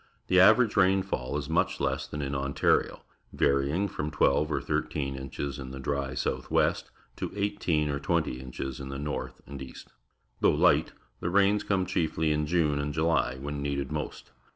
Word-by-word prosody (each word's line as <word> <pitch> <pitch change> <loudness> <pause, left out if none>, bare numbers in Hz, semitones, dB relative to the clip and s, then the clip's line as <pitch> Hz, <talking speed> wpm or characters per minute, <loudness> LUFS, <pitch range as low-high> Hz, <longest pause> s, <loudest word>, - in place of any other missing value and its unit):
The 90 - +5
average 110 +4 +6
rainfall 95 -9 +2
is 70 -1 -4
much 80 +2 +1
less - - -1
than 75 -1 -5
in 70 0 -3
Ontario, 70 0 +1 0.3
varying 70 +8 +2
from 75 -5 -4
twelve 75 0 +2
or - - +1
thirteen 70 -2 -2
inches 70 +1 -5
in 65 -1 -6
the 65 0 -7
dry 70 -1 -2
south - - -2
west - - +1 0.3
to - - -4
eighteen 100 -7 0
or 70 -1 -1
twenty 80 -4 0
inches 65 0 -6
in 70 -1 -6
the 70 - -5
north 75 +1 -4
and 70 -1 -8
east. 65 - -10 0.5
Though - - +3
Ught, - - +3 0.3
the 85 - -2
rains 100 +3 +3
come 95 -2 +1
chiefly 80 -3 0
in 75 0 0
June 75 -3 +2
and 70 0 -3
July, 80 -6 +1
when 70 +1 -4
needed 70 -1 -2
most. - - -5
75 Hz, 175 wpm, -28 LUFS, 70-85 Hz, 0.5 s, average